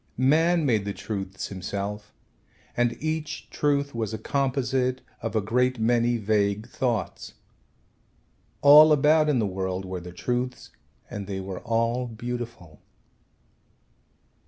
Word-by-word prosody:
Man 160 +6 +3
made 110 -6 +2
the 100 - -4
truths 95 -3 -5
himself 100 +2 -5 0.6
and 120 -1 +1
each 155 0 -4
truth 140 -1 0
was 110 -2 -3
a - - -4
composite 130 +1 0 0.2
of 115 -1 -4
a 110 - +3
great 125 +5 +1
many 120 +1 +2
vague 105 0 0
thoughts. 120 -5 -3 1.3
All 150 +2 +9
about 150 +2 +4
in 145 - +2
the 110 - +1
world 95 -1 -3
were 95 -1 -5
the 90 0 -9
truths 125 +7 -3 0.4
and 100 -2 -6
they 95 -1 -4
were 95 -1 -6
all 115 +2 0
beautiful. 120 - -7
120 Hz, 125 wpm, -26 LUFS, 100-130 Hz, 1.3 s, All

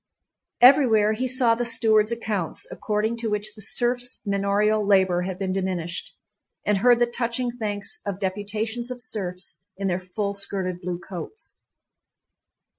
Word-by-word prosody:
Everywhere 240 -5 +6
he 255 +4 -2
saw 250 -2 +4
the 235 +1 -1
stewards' 225 -2 +3
accounts, 215 -7 -3
according 215 +2 -1
to 230 -1 -2
which 210 0 -1
the 215 - -10
serfs' 245 +3 +1
manorial 200 +2 +1
labor 190 -3 +3
had 180 0 -4
been 190 -1 -2
diminished, 180 -3 -3 0.5
and 205 -2 +2
heard 245 +3 +5
the 240 - +4
touching 240 +1 -1
thanks 210 +6 -2
of 200 -3 -3
deputations 215 +5 -3
of 250 -1 -6
serfs 190 -6 -3 0.2
in 195 0 -2
their 180 -1 0
full 200 +2 -3
skirted 190 -3 -2
blue 175 -1 -3
coats. 185 - -8
210 Hz, 145 wpm, -24 LUFS, 190-235 Hz, 0.5 s, Everywhere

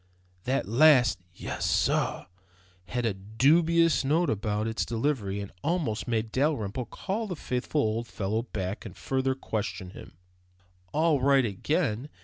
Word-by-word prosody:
That 135 -2 0
last 125 - +5
"Yes, - - -5
sorr," - - +1 0.6
had 120 +7 -2
a 110 - +1
dubious 155 - +3
note 160 +6 +2
about 105 0 -1
its 110 +1 -1
delivery 115 -5 -1
that 100 - -7
almost 155 -11 -1
made 110 -2 -1
Dalrymple 125 -5 -1
call 210 - -3
the 180 - -4
faithful 135 +1 -1
old 115 +1 -1
fellow 105 +2 -2
back 100 -3 -4
and - - -10
further 130 0 0
question 100 -7 -4
him. 80 - -12 0.7
"All 155 -3 +2
right 135 -1 +4
again?" 125 - -1
125 Hz, 135 wpm, -28 LUFS, 105-150 Hz, 0.7 s, last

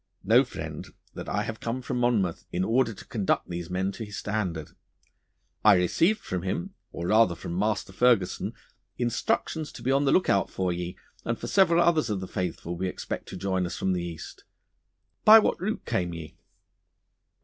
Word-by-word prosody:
Know, 115 +7 +6
friend, 75 - -7 0.3
that - - -7
I - - 0
have 110 -1 -5
come 120 +2 -3
from 125 -1 -2
Monmouth 110 -8 +1
in 90 - 0
order 115 +3 +2
to 100 - -11
conduct 105 -5 0
these 85 0 -5
men 95 +2 -1
to 110 - -7
his 105 -1 -7
standard. 95 -7 -3 0.9
I - - +8
received 165 - +2
from 90 -1 -3
him, 105 - -3 0.2
or 85 - -5
rather 110 -5 +5
from 85 - -6
Master 105 0 -1
Ferguson, 115 -4 +2 0.4
instructions 125 +5 -1
to - - -10
be 130 - +1
on 140 +1 +3
the 135 - +3
lookout 100 - +3
for 90 -2 -1
ye 90 +1 -5 0.3
and - - -1
for - - -7
several 175 -3 +4
others 160 -6 +2
of 105 -2 -1
the 95 - -6
faithful 85 -1 -3
we 95 +2 -2
expect 90 - -5
to - - -6
join 95 -1 -1
us 85 - -6
from 95 - 0
the 90 - -1
East. 85 -2 -8 0.8
By 215 +1 +10
what 215 - +2
route 215 +4 -2
came 90 -2 -1
ye? 80 -2 -9
100 Hz, 185 wpm, -27 LUFS, 90-125 Hz, 0.9 s, By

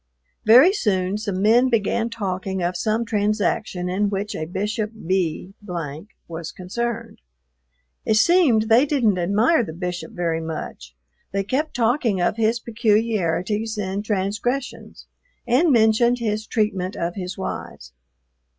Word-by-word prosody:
Very 255 - +7
soon 195 - 0
some 200 -3 -3
men 240 +4 +5
began 230 0 0
talking 190 -4 -3
of 175 +1 -1
some 225 +1 0
transaction 205 -4 -1
in 200 +3 0
which 200 +1 -3
a 155 - -3
Bishop 210 +4 -2
B 185 0 -1 0.7
was 165 -1 -6
concerned. 230 +4 -5 0.8
It 220 - +1
seemed 240 -1 +4
they 230 +6 +4
didn't 230 -10 +2
admire 215 - +3
the 160 - -7
Bishop 180 +5 -5
very 170 -4 -1
much; 155 - -7 0.4
they 195 0 0
kept 275 +9 -2
talking 235 -4 +1
of 175 +4 0
his 225 +1 +1
peculiarities 215 -2 0
and 200 0 -3
transgressions, 210 +6 -3 0.4
and 265 +7 +3
mentioned 235 +1 +4
his 215 -2 -2
treatment 200 -5 -1
of 170 +1 -2
his 185 -1 -6
wives. 65 - -6
210 Hz, 130 wpm, -22 LUFS, 185-230 Hz, 0.8 s, Very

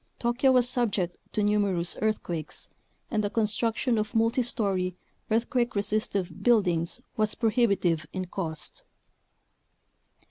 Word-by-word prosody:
(Tokyo 240 +3 +2
was 250 -1 +4
subject 205 -8 0 0.2
to 210 - 0
numerous 200 -4 +1
earthquakes 175 -7 -2 0.4
and 215 -3 +1
the 205 - 0
construction 225 +2 +1
of 215 +2 -3
multi 230 +3 +3
story, 195 -7 -1 0.3
earthquake 240 +2 +1
resistive 200 -3 -1
buildings 180 -8 +2 0.2
was 215 -1 +1
pro 225 -2 +1
hibitive 190 -9 +2
in 185 -1 -3
cost.) 165 -4 -4
210 Hz, 115 wpm, -28 LUFS, 185-235 Hz, 0.4 s, was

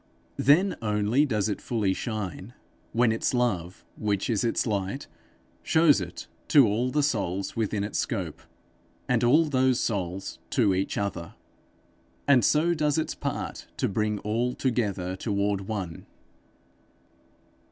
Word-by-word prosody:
Then 175 +9 +4
only 105 +6 +2
does 110 -5 0
it 105 - -3
fully 105 -5 0
shine, 105 0 -5 0.4
when 120 0 +3
its 115 +3 0
love, 95 -8 -1
which 105 +1 -1
is 110 - +1
its 115 - +1
light, 105 +4 -2 0.6
shows 160 -8 +4
it 85 -1 -7 0.2
to 140 -4 +7
all 115 +4 0
the 150 +3 +1
souls 100 -8 -1
within 105 -2 -1
its 105 - -2
scope, - - -3 0.7
and - - +2
all 150 +7 +5
those 130 -3 +2
souls 95 -3 -3
to 100 - +3
each 95 +1 -1
other, 90 -4 -3 0.9
and 130 -4 +5
so 165 +3 +3
does 150 -2 +1
its 160 - -1
part - - -5
to - - +1
bring 105 +1 0
all 115 +4 -1
together 100 -8 -1
toward 100 -1 -1
one. 95 -7 -5
110 Hz, 135 wpm, -27 LUFS, 100-130 Hz, 0.9 s, to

